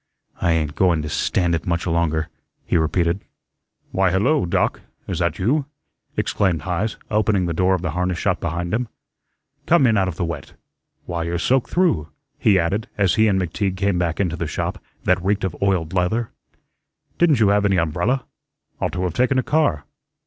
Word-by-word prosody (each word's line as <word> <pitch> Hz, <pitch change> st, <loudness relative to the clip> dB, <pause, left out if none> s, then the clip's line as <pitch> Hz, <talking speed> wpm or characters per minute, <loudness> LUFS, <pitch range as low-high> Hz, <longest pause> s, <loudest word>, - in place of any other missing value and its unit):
"I 85 Hz, -, +3 dB
ain't 75 Hz, -3 st, 0 dB
going 85 Hz, -3 st, +2 dB
to 75 Hz, -, -4 dB
stand 85 Hz, +2 st, 0 dB
it 80 Hz, -1 st, -2 dB
much 85 Hz, 0 st, 0 dB
longer," 80 Hz, -2 st, 0 dB, 0.4 s
he -, -, -1 dB
repeated. 85 Hz, +3 st, +1 dB, 0.7 s
"Why, 95 Hz, 0 st, +2 dB
hello, 95 Hz, -, +2 dB
Doc. -, -, 0 dB, 0.3 s
Is -, -, -3 dB
that -, -, 0 dB
you?" 135 Hz, +9 st, +1 dB, 0.5 s
exclaimed 90 Hz, -7 st, 0 dB
Heise, 95 Hz, +5 st, -2 dB
opening 105 Hz, -3 st, +2 dB
the 85 Hz, -, -1 dB
door 95 Hz, +3 st, +3 dB
of 90 Hz, -, -5 dB
the 85 Hz, -, -1 dB
harness 90 Hz, +1 st, -1 dB
shop 95 Hz, +1 st, 0 dB
behind 85 Hz, +2 st, -3 dB
him. 120 Hz, +2 st, 0 dB, 0.8 s
"Come 165 Hz, -5 st, +5 dB
in 115 Hz, -3 st, +3 dB
out 95 Hz, -1 st, +2 dB
of 90 Hz, -, -3 dB
the 85 Hz, -, -1 dB
wet. 85 Hz, -, -6 dB, 0.5 s
Why, 85 Hz, -1 st, -3 dB
you're 85 Hz, +1 st, -2 dB
soaked 130 Hz, +8 st, +1 dB
through," 170 Hz, -, +2 dB, 0.3 s
he 100 Hz, -3 st, +4 dB
added 95 Hz, +5 st, 0 dB
as 100 Hz, -3 st, +3 dB
he 110 Hz, 0 st, +4 dB
and 95 Hz, -2 st, +2 dB
McTeague 95 Hz, +2 st, -2 dB
came 100 Hz, -2 st, +1 dB
back 85 Hz, -2 st, -1 dB
into 90 Hz, -4 st, 0 dB
the 85 Hz, -, -3 dB
shop, -, -, -3 dB, 0.2 s
that 90 Hz, -1 st, +2 dB
reeked 100 Hz, +1 st, +1 dB
of 95 Hz, -3 st, -2 dB
oiled 95 Hz, -4 st, +1 dB
leather. 95 Hz, +6 st, 0 dB, 0.9 s
"Didn't 160 Hz, -7 st, +4 dB
you 105 Hz, -3 st, +4 dB
have 100 Hz, 0 st, +3 dB
any 100 Hz, -2 st, +2 dB
umbrella? 90 Hz, -, 0 dB, 0.5 s
Ought -, -, -1 dB
to 90 Hz, 0 st, -2 dB
have 90 Hz, -, -1 dB
taken 130 Hz, +2 st, +2 dB
a 130 Hz, -, +2 dB
car." 145 Hz, -, +1 dB
90 Hz, 190 wpm, -22 LUFS, 85-105 Hz, 0.9 s, Come